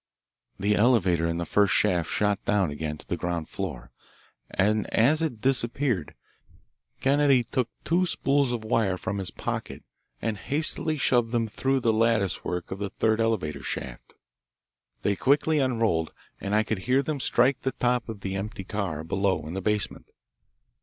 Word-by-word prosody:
The 105 +2 +2
elevator 95 -8 +3
in 85 0 -1
the 85 - -2
first 100 +2 +3
shaft 90 -6 +2
shot 105 -1 0
down 100 -6 +1
again 75 +1 -4
to - - -15
the - - -1
ground 85 -2 -3
floor, 75 -11 -6 0.6
and 105 +2 +1
as 145 +8 +4
it 130 -10 -2
disappeared 120 - 0 0.9
Kennedy 140 -2 +4
took 125 0 -1 0.2
two 180 +2 +2
spools 140 -5 +1
of 120 -2 -3
wire 110 -4 +1
from 100 +2 -3
his 95 - -3
pocket - - -5 0.4
and 110 -2 -2
hastily 155 +3 0
shoved 120 -4 +2
them 115 -2 +1
through 135 +5 0
the 115 -2 +2
lattice 110 -3 +1
work 90 -1 -3
the 100 0 -4
third 110 +2 +1
elevator 90 -11 -1
shaft. 60 -1 -6 0.9
They 100 - +2
quickly 145 - +2
unrolled, 115 - +1 0.3
and 100 +1 -1
I 110 - +4
could 110 -2 -2
hear 135 +2 +4
them 150 0 -3
strike 130 +1 +2
the 130 - -2
top 125 -1 0
of 105 -3 -7
the 95 0 -3
empty 100 0 -4
car 95 -6 -3
below 95 -1 0
in 80 - -6
the 95 - -3
basement. 105 0 -2
110 Hz, 165 wpm, -26 LUFS, 95-125 Hz, 0.9 s, as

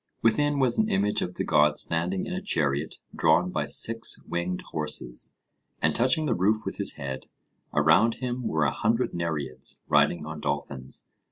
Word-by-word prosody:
Within 145 +6 +2
was 130 -3 +4
an 110 - +2
image 100 +2 +1
of 90 - -4
the - - -2
god 75 0 +3
standing 90 +3 +1
in - - -5
a - - -3
chariot 75 0 -1 0.2
drawn - - +2
by - - -2
six 115 0 +4
winged 90 +1 -3
horses, 75 -5 -2 0.4
and - - +1
touching 130 +7 +2
the 130 - +1
roof 110 +3 +1
with - - -4
his - - 0
head; 65 -1 -6 0.4
around 80 +10 +3
him 125 -1 -4
were 80 -1 +1
a 70 - +1
hundred 115 +4 0
Nereids, 80 -6 -4
riding 75 +2 +2
on 80 0 -7
dolphins. 70 -2 -3
85 Hz, 170 wpm, -26 LUFS, 75-115 Hz, 0.4 s, was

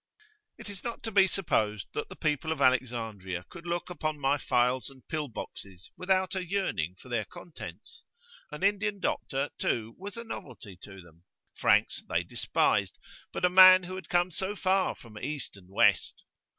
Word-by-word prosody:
It - - -10
is 200 -2 -7
not 235 -1 -5
to 225 - -4
be 195 -2 +6
supposed 110 - 0
that - - -3
the - - -9
people 155 +1 -1
of 160 - -2
Alexandria 115 -8 0
could 170 0 -10
look 175 +1 -2
upon 155 -3 -3
my 140 +1 +2
phials 125 +1 +1
and 135 -2 -18
pill 155 -3 -2
boxes 95 -5 -9
without 185 0 +1
a 190 -1 -2
yearning 170 - -1
for - - -15
their 120 -3 -1
contents. 160 - -11 0.5
An 150 +5 -7
Indian 205 0 +1
doctor, 135 -5 -1
too, 115 0 -1
was 200 +3 -7
a 235 - -5
novelty 125 - -8
to 95 -2 -11
them; 85 0 -20 0.3
Franks - - +2
they - - +1
despised, - - +1 0.3
but - - 0
a - - +4
man 185 0 +9
who 180 +1 -6
had 185 0 -7
come 175 +1 +2
so 190 +3 -3
far 190 -1 +1
from 110 -3 -12
East 145 -3 -4
and 95 -2 -16
West! 95 - +2
150 Hz, 175 wpm, -29 LUFS, 115-185 Hz, 0.5 s, man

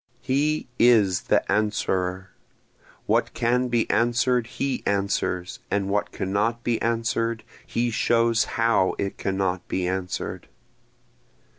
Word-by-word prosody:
He 150 +4 0
is 105 -7 +4
the - - +4
Answerer, 95 -3 -1 0.7
What - - +1
can 125 +1 +1
be 120 -2 +1
answer'd 120 0 +2
he 135 +2 -2
answers, 100 -2 -1
and 100 -1 0
what 100 +1 0
cannot 105 +5 -1
be 120 -2 0
answer'd 115 0 -1 0.2
he 120 0 0
shows 115 0 +2
how 115 -5 +2
it 100 - -3
cannot 95 -2 -1
be 90 -1 -1
answer'd. 90 0 -4
115 Hz, 115 wpm, -24 LUFS, 95-120 Hz, 0.7 s, is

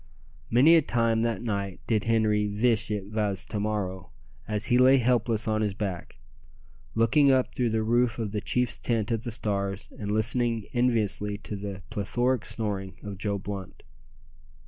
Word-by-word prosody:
Many 135 +8 +6
a 165 - +7
time 115 -4 +1
that 115 -2 -1
night 100 -4 -3
did 110 -3 0
Henri 110 -2 +2
"veesh 110 +2 +1
it 105 -2 -2
vas 105 -3 -1
to 105 - -4
morrow," 95 -4 -3 0.4
as 105 0 +1
he 125 - +3
lay 130 +2 +7
helpless 115 -3 +1
on 110 0 +1
his 105 -2 -1
back, 95 -7 -5 0.8
looking 125 +5 +4
up 130 -1 +2
through 125 -2 0
the 110 0 0
roof 120 +1 +2
of 110 -3 -3
the 105 0 -2
chief's 125 +1 -1
tent 115 -2 -1
at 115 -2 0
the 120 - -5
stars, 100 -3 -3
and 105 -1 -3
listening 115 +1 0
enviously 110 -4 +1
to 105 - -7
the 100 -1 -6
plethoric 120 +4 0
snoring 100 -4 -4
of 100 -2 -7
Joe 100 -1 -1
Blunt. 100 -1 -7
110 Hz, 170 wpm, -27 LUFS, 100-120 Hz, 0.8 s, a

